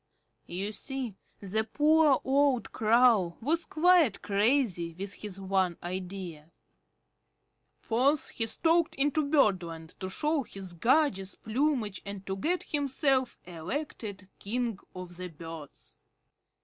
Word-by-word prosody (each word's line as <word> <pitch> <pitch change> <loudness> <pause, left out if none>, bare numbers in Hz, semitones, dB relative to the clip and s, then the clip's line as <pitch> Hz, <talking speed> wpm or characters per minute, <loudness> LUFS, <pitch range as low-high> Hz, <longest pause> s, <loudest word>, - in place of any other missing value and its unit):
You 195 +4 -3
see 260 0 -4 0.3
the 205 +2 0
poor 300 +4 +4
old 270 -4 +2
Crow 220 -6 +3
was 325 +8 0
quite 340 -4 +3
crazy 200 - +1
with 195 +2 -3
his 200 -2 -7
one 190 -2 0
idea. 180 -3 -6 1.3
Forth 265 +6 +2
he 225 - 0
stalked 330 +6 +3
into 290 +2 +2
Birdland 185 - +1
to 185 - -4
show 300 +9 0
his 195 -7 -5
gorgeous 200 - +2
plumage 235 -3 -1
and 200 -1 -7
to 190 - -3
get 340 - -1
himself 270 -3 +1
elected 190 - -5
King 230 -1 -2 0.2
of 180 -1 -8
the 185 0 -5
Birds. 165 -2 -10
215 Hz, 115 wpm, -29 LUFS, 185-280 Hz, 1.3 s, poor